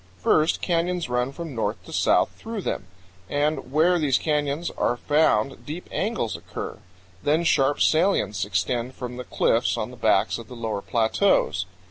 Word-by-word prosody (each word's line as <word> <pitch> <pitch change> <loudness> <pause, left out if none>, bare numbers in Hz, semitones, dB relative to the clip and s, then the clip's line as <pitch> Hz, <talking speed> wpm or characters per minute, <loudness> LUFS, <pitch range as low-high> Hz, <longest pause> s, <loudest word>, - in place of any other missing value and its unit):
First, 155 - +2
canyons 175 -3 0
run 125 +1 0
from 165 0 -7
north 115 - -3
to - - -10
south - - +3
through 225 -2 -6
them, 95 - -3 0.4
and 145 -2 -1
where 170 +4 +4
these 140 -5 +3
canyons 150 +1 -1
are 120 - 0
found 140 -3 +2
deep 160 +4 -7
angles 205 - -1
occur; - - -7 0.4
then 155 +3 +2
sharp 145 -3 +2
salients 155 - +2
extend 115 +7 -1
from 125 -1 -6
the 125 - -5
cliffs - - +1
on - - -3
the - - -10
backs - - +2
of 115 - -10
the 125 - -10
lower 110 -3 -3
plateaus. 110 - +1
140 Hz, 160 wpm, -24 LUFS, 120-165 Hz, 0.4 s, where